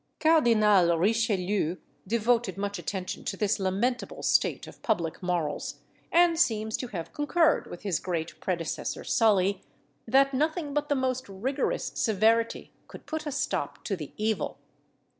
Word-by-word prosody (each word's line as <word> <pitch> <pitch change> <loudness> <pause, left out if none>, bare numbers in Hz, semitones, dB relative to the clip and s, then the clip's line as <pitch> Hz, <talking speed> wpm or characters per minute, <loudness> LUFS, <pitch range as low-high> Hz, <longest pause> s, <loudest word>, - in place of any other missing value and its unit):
Cardinal 215 - +4
Richelieu 200 -3 +1 0.3
devoted 230 -1 +1
much 200 -1 -3
attention 185 +1 -4
to - - -3
this 210 0 +1
lamentable 205 +7 -1
state - - +2
of - - -14
public 170 -8 -1
morals, 175 -4 -2 0.4
and 340 -1 +4
seems 220 -8 +1
to 250 - -4
have 175 -8 -6
concurred 315 +2 +2
with 175 - -9
his 195 -6 0
great 170 -2 -4
predecessor 170 -4 -3
Sully, 200 -3 +2 0.5
that 275 +3 +4
nothing 305 +2 -1
but 295 0 -1
the 290 - +2
most 260 -2 -1
rigorous 255 +9 -2
severity 225 0 +1 0.2
could - - -12
put 315 -1 -4
a - - -2
stop 275 - -2
to 200 - -1
the 155 -6 -8
evil. 215 0 -1
220 Hz, 140 wpm, -28 LUFS, 190-260 Hz, 0.5 s, Cardinal